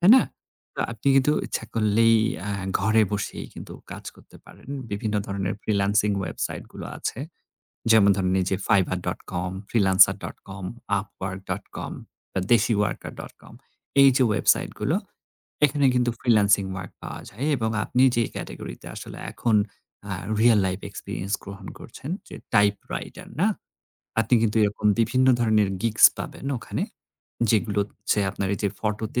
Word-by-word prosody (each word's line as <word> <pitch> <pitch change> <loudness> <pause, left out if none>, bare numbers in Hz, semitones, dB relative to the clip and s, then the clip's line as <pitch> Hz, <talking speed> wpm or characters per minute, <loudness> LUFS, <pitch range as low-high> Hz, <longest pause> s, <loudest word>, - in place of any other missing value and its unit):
তাই 175 +3 +6
না? 260 - +6 0.5
তো - - -4
আপনি 115 +5 -2
কিন্তু 135 +2 +4
ইচ্ছা - - -3
করলেই 115 +1 +4 0.3
আ - - -1 0.3
ঘরে 110 +2 +4
বসেই 100 0 -3
কিন্তু - - -9 0.2
কাজ - - -8
করতে - - -17
পারেন। - - -16 0.2
বিভিন্ন 105 +1 -2
ধরনের 100 -1 -2
ফ্রিল্যান্সিং 100 0 +2
ওয়েবসাইটগুলো 95 - -5
আছে। - - -4 0.7
যেমন 105 -2 +7
ধরেন 95 -1 +1
এইযে 95 +1 0
fiverr.com, 90 -2 0 0.2
freelancer.com, 95 -1 +2 0.4
upwork.com 95 -1 -6 0.4
বা 95 - 0
deshiworker.com। 110 -3 0 0.5
এইযে 135 -1 +6
ওয়েবসাইটগুলো, 105 - +1 0.7
এখানে 145 0 +1
কিন্তু 125 -1 +2
ফ্রিল্যান্সিং 105 -4 +4
ওয়ার্ক 95 -2 -6
পাওয়া - - -6
যায় 120 +8 -5
এবং 110 -3 -1
আপনি 125 - +1
যেই 115 -1 +1
ক্যাটেগরিতে - - -7
আসলে - - -8
এখন 115 -3 +1 0.5
আ - - -3 0.3
রিয়াল 115 -1 +6
লাইফ 95 +1 -2
এক্সপেরিয়েন্স 100 0 -5
গ্রহণ 100 -1 -9
করছেন, 135 +4 -9 0.2
যে - - -9 0.2
টাইপ 105 0 +5 0.2
রাইটার - - -6
না? 200 - +5 0.7
আপনি 110 +2 +1
কিন্তু 110 -1 +1
এরকম 105 0 0
বিভিন্ন 130 +3 +3
ধরনের 110 -4 +3
GIGS 115 -1 +6
পাবেন - - -7
ওখানে। - - -3 0.7
যেগুলো 105 -2 +2
হচ্ছে 105 - -2
আপনার 100 - -3
এইযে 100 +1 -1
ফটোতে 110 +3 -2
105 Hz, 130 wpm, -25 LUFS, 100-115 Hz, 0.7 s, যেমন